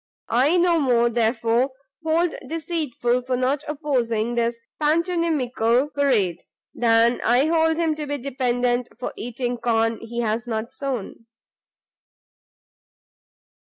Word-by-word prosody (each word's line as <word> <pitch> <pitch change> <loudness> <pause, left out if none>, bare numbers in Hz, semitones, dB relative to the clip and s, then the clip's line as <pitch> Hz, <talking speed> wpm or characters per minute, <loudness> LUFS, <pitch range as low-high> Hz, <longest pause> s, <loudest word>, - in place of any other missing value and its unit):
I 270 +9 +3
no 345 -1 +3
more, 240 -4 +3
therefore, 235 +2 +1 0.3
hold 325 +2 +2
him - - -10
deceitful 300 -7 -1
for 250 0 -2
not 265 +3 0
opposing 245 -7 -1
this 235 0 0 0.2
pantomimical 295 -6 +1
parade, 220 - +1 0.3
than 230 0 +3
I 245 +4 +3
hold 320 0 +2
him 330 -2 +1
to 300 -1 -5
be 290 0 -2
dependent 245 -2 0
for 250 - -4
eating 245 +1 -3
corn 225 -1 +1
he 235 +1 -4
has 225 +1 -1
not 220 0 -3
sown." 250 -4 -5
250 Hz, 120 wpm, -23 LUFS, 235-295 Hz, 0.3 s, I